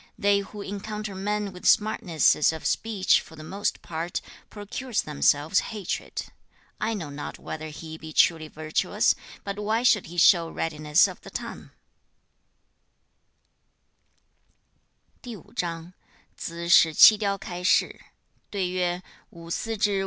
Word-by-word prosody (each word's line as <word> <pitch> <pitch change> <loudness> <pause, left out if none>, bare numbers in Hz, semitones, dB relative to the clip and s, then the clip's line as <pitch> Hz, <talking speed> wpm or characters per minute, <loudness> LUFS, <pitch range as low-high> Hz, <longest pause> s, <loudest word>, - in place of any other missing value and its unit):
They 200 -1 +3
who 200 +1 -7
encounter 210 +1 -5
men 205 +1 -2
with 180 - -4
smartnesses 175 -9 +3
of 160 -1 -8
speech 210 -4 +2
for 160 - -14
the 155 - -10
most 195 +6 -3
part 165 +1 -4 0.3
procure 215 +5 -7
themselves 150 0 +2
hatred. 205 -4 -4 0.6
I 225 +1 -1
know 160 -8 -6
not 145 +1 -7
whether 155 0 -7
he 160 +1 -9
be 160 0 -9
truly 160 0 +3
virtuous, 155 0 0 0.3
but 200 0 -5
why 220 +3 0
should 215 -5 +3
he 175 +2 -10
show 170 -1 +5
readiness 155 0 +2
of - - -10
the - - -11
tongue?' - - -7
185 Hz, 95 wpm, -26 LUFS, 160-210 Hz, 0.6 s, show